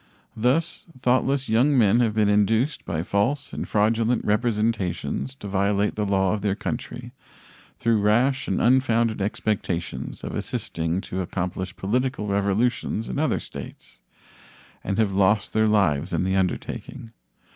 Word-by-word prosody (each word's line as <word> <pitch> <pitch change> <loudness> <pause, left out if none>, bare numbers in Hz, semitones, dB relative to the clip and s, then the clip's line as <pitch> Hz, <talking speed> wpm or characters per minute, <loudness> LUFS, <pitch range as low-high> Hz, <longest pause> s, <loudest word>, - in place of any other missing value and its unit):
Thus 125 +12 0
thoughtless 130 +2 +1
young 130 +6 +3
men 115 -1 +4
have 115 -3 +1
been 105 -2 +3
induced 110 +7 +2
by 80 -1 -2
false 120 +10 0
and - - -4
fraudulent 115 +3 +1
representations 110 +2 -1
to 105 - -9
violate 100 +1 +1
the 105 -1 -2
law 95 -1 +2
of 105 - -2
their 100 -1 0
country - - -5 0.7
through 115 -2 +2
rash 120 +6 +2
and - - 0
unfounded 115 -4 +2
expectations 95 -4 -3
of - - -5
assisting 85 +3 -2
to 95 0 -4
accomplish 90 0 -4
political 125 +3 -1
revolutions 100 +3 0
in - - -3
other 155 - +1
states, - - -10 0.8
and 100 - -2
have 105 -3 +1
lost 100 +1 +2
their 110 0 +3
lives 95 -6 +2
in - - +1
the 95 +1 0
undertaking. 110 +5 -3
105 Hz, 140 wpm, -24 LUFS, 95-120 Hz, 0.8 s, men